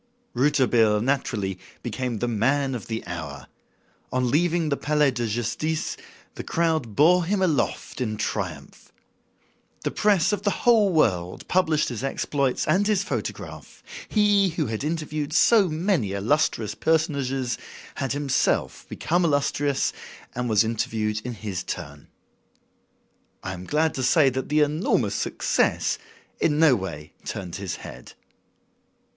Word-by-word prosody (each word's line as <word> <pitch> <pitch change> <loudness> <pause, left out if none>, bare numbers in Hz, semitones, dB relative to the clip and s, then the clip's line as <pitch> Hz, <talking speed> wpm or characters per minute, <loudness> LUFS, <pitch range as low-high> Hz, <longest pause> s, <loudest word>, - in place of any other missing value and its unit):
Rouletabille, 120 -5 +3
naturally, 105 -6 -1 0.2
became 120 0 -3
the 120 - -1
"man 135 +5 +1
of 120 -5 -6
the 115 0 -4
hour." 80 -5 -6 0.7
On 125 -1 0
leaving 170 +1 +2
the 140 - +1
Palais 150 -1 +2
de 120 -2 -2
Justice, 120 +8 -2 0.4
the - - -7
crowd 160 -10 0
bore 175 +4 +5
him 200 +3 0
aloft 165 -6 -1
in 110 -3 -2
triumph. 90 -10 -5 0.9
The - - -1
press 205 -3 +2
of 205 - -1
the 205 -1 -1
whole 220 -5 +5
world 90 - +1
published 160 -4 +2
his 120 0 -5
exploits 135 -1 -1
and 190 +6 +3
his 205 -3 +2
photograph. - - -6 0.3
He, 205 -2 +4
who 160 -2 -2
had 110 +2 -3
interviewed 155 -1 -3
so 205 +1 +5
many 155 - 0
illustrious 110 0 +1
personages, 140 -5 0 0.3
had 135 - -2
himself 140 -2 0
become 175 +2 0
illustrious 145 -2 +1 0.4
and 125 0 -2
was 110 0 +4
interviewed 110 -1 -1
in 125 -1 -5
his 100 -4 -4
turn. 75 -5 -7 1.4
I 95 - -4
am 90 0 -8
glad 155 +5 +1
to 130 - -3
say 135 +2 +4
that 130 +1 -4
the 150 +1 +3
enormous 150 +4 +1
success - - 0 0.4
in 150 -2 +2
no 155 -4 +6
way 85 -7 -6
turned 90 -2 -5
his 95 -3 -4
head. - - -10
135 Hz, 135 wpm, -25 LUFS, 110-160 Hz, 1.4 s, no